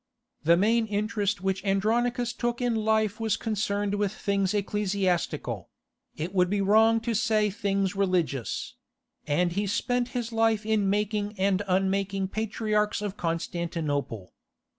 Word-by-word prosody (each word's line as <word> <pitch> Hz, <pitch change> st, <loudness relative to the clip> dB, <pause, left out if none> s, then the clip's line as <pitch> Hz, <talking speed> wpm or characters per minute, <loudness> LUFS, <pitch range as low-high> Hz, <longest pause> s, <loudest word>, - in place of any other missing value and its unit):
The 170 Hz, +2 st, +5 dB
main 225 Hz, +4 st, +2 dB
interest 205 Hz, -1 st, -1 dB
which 195 Hz, 0 st, -1 dB
Andronicus 235 Hz, +5 st, +1 dB
took 240 Hz, 0 st, -2 dB
in 245 Hz, -2 st, +1 dB
life 220 Hz, -1 st, +1 dB
was 220 Hz, -3 st, 0 dB
concerned 205 Hz, -2 st, -1 dB
with 205 Hz, -1 st, 0 dB
things 200 Hz, -2 st, 0 dB
ecclesiastical—it 195 Hz, -4 st, -3 dB
would 180 Hz, -2 st, +3 dB
be 205 Hz, +1 st, 0 dB
wrong 220 Hz, +3 st, +4 dB
to 230 Hz, 0 st, -1 dB
say 215 Hz, -1 st, +2 dB
things 195 Hz, -1 st, -1 dB
religious—and 175 Hz, -, -2 dB
he 200 Hz, +3 st, -1 dB
spent 245 Hz, +4 st, 0 dB
his 235 Hz, -1 st, -3 dB
life 225 Hz, -1 st, +2 dB
in 215 Hz, -3 st, +2 dB
making 210 Hz, +1 st, -1 dB
and 190 Hz, 0 st, +2 dB
unmaking 195 Hz, +1 st, 0 dB
patriarchs 210 Hz, 0 st, -1 dB
of 205 Hz, -1 st, -3 dB
Constantinople. 165 Hz, -, -3 dB
205 Hz, 125 wpm, -27 LUFS, 190-220 Hz, -, The